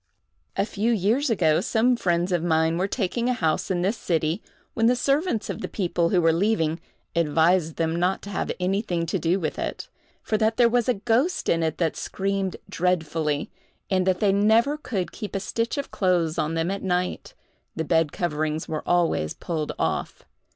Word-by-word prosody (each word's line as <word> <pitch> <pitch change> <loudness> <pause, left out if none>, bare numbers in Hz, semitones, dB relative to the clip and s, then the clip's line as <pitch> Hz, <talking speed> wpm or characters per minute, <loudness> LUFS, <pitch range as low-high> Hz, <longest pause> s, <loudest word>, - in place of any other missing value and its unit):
A 195 - +2
few 215 +2 -1
years 230 +7 +1
ago, 165 -7 +3
some 235 +5 +2
friends 175 -4 0
of 175 -2 +1
mine 160 0 +2
were 190 - +1
taking 230 +3 -1
a - - +3
house 160 -9 0
in 175 -2 0
this 205 +5 0
city, 165 +1 -1 0.3
when 225 0 +2
the 250 - +4
servants 275 - 0
of - - -5
the - - -3
people 175 -3 0
who 185 - +3
were 165 -1 +4
leaving 165 -3 +1 0.4
advised 165 +1 +2
them 165 0 0
not 180 +2 0
to 200 - -7
have 195 - -2
anything 180 -2 0
to 160 - -1
do 175 +3 +1
with 155 -4 -3
it, - - -4 0.3
for 215 - 0
that 220 0 +1
there 240 - +6
was 245 0 +1
a 250 - +3
ghost 240 - 0
in 165 - +2
it 160 -1 -1
that 165 -3 0
screamed 195 -1 -2
dreadfully, 160 -4 -1 0.4
and 185 -1 +2
that 185 -1 +1
they 205 -2 +4
never 220 +8 +3
could 210 - -3
keep 210 -3 -7
a - - +1
stitch 230 +7 -2
of 280 - -4
clothes 175 -4 +1
on 155 +2 -1
them 165 +3 0
at 195 - -3
night—the 180 - -4
bed 160 -2 +2
coverings 155 -2 -2
were 155 -1 -3
always 170 - +1
pulled 155 -3 -3
off. - - -2
180 Hz, 190 wpm, -25 LUFS, 165-220 Hz, 0.4 s, there